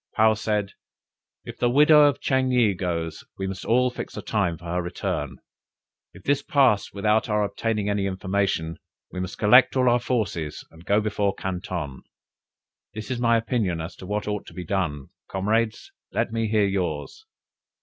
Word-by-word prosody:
Paou 110 0 +5
said 105 -2 -1 0.7
"If - - -9
the 120 - +2
widow 150 +3 +7
of 145 - +2
Ching 130 -1 +1
yih 120 -5 +3
goes, 85 -3 -3
we 95 - -3
must 95 -1 -5 0.3
fix - - -6
a - - -5
time 95 -6 0
for 85 - -15
her 90 +1 -1
return. 90 0 -3 0.7
If 100 - -15
this 145 +3 +1
pass 130 -8 +2
without 105 +3 +1
our 105 0 +2
obtaining 105 0 -1
any 100 -1 0
information, 95 -3 -1 0.3
we 90 - -5
must 95 +2 -5
collect 125 +6 +6
all 130 -1 +3
our 120 0 +4
forces, 100 - -2
and 80 +2 -16
go 105 +1 +3
before 100 -2 0
Canton: 90 -6 -4 0.9
this 110 +1 -6
is 125 - -2
my 115 -1 +4
opinion 110 -7 -1
as 80 +1 -6
to 95 - -10
what 105 +1 -2
ought 105 -1 -3
to 80 - -12
be 90 0 -6
done; 75 -7 -2 0.2
comrades, 110 +4 -1 0.2
let - - -1
me 115 0 -1
hear 105 -1 +2
yours!" 95 - -3
105 Hz, 170 wpm, -25 LUFS, 90-115 Hz, 0.9 s, widow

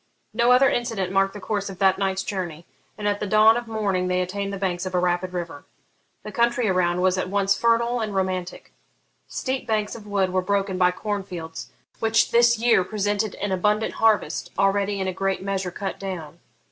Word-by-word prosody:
No 235 +2 +3
other 255 +2 +6
incident 225 -8 -1
marked 195 +1 +1
the - - -6
course 205 0 -3
of 190 - -8
that 190 -1 +3
night's 190 -1 0
journey, 175 -5 -5 0.3
and 210 - -3
at 205 0 0
the 210 - -3
dawn 215 +2 +6
of 240 -1 -3
morning 200 -5 -1
they 180 0 +1
attained 195 +2 -3
the 200 - -4
banks 185 -1 -2
of 185 - -4
a - - +3
rapid 180 +1 0
river. 170 -5 -5 0.6
The - - -7
country 235 -2 +1
around 180 -2 +1
was 185 0 +2
at 185 - -2
once 200 0 +2
fertile 235 +1 +2
and 215 -3 -3
romantic. 185 -1 -3 0.5
Steep 260 -1 -3
banks 215 -2 0
of 215 -2 -10
wood 195 -2 0
were 185 - +2
broken 195 0 -1
by 180 -1 +5
corn 205 +2 -3
fields, 165 -4 -8 0.3
which 225 0 +2
this 235 0 +5
year 230 -4 +3
presented 205 +1 -1
an 205 0 -3
abundant 210 +4 +1
harvest, 220 -3 +2
already 195 +1 +1
in 190 - -1
a 185 - -2
great 195 0 -2
measure 195 -2 -2
cut 195 +2 -5
down. 175 -4 -6
195 Hz, 200 wpm, -24 LUFS, 185-215 Hz, 0.6 s, other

